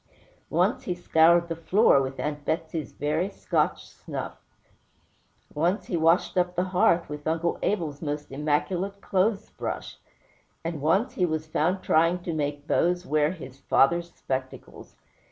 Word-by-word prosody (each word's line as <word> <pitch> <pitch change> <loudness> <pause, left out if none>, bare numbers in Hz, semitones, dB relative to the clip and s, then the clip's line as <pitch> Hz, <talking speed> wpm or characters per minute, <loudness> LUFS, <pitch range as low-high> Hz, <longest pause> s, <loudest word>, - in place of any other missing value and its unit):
Once - - +1
he 180 - -1
scoured 170 0 +4
the 165 - -3
floor 165 -2 +4
with 135 0 -4
Aunt 150 -1 -3
Betsey's 160 -1 -3
very 155 +6 -1
Scotch - - -1
snuff; - - -7 1.2
once 175 +7 0
he - - -3
washed 165 +3 +3
up 180 0 0
the 180 - +1
hearth 180 -2 +2
with 150 0 -7
Uncle 165 +1 0
Abel's 160 -8 -1
most 150 -2 -4
immaculate 170 +7 -1
clothes 200 +2 0
brush; - - -5 0.7
and 165 -3 -3
once 190 - +2
he 180 - +1
was 155 -1 -2
found 175 +4 0
trying 165 +3 +3
to 170 - -3
make 145 -1 -2
Bose 175 +3 +1
wear 150 -1 +2
his 135 -7 -10
father's 170 +6 +2
spectacles. 130 0 -6
165 Hz, 145 wpm, -26 LUFS, 150-180 Hz, 1.2 s, scoured